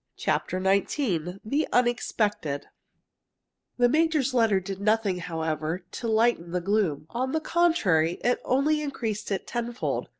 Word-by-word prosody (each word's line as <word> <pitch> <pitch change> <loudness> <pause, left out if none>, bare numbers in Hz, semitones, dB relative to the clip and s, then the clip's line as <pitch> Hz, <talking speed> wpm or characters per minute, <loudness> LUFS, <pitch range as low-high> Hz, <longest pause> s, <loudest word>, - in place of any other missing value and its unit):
CHAPTER 185 - -1
XIX 190 - 0
THE 285 +8 0
UNEXPECTED 215 - 0 1.1
The 245 0 +5
major's 305 -1 +2
letter 225 -5 +3
did 190 +1 -6
nothing, 210 -3 +2
however, 160 0 -3
to 235 - -5
lighten 220 -6 +2
the 180 +1 -1
gloom. 185 -6 0
On 260 +2 -2
the 315 - +2
contrary, 265 - +2
it 245 - +1
only 295 +4 +2
increased 225 -7 -3
it 195 - -2
tenfold. 240 0 -3
220 Hz, 130 wpm, -26 LUFS, 180-255 Hz, 1.1 s, The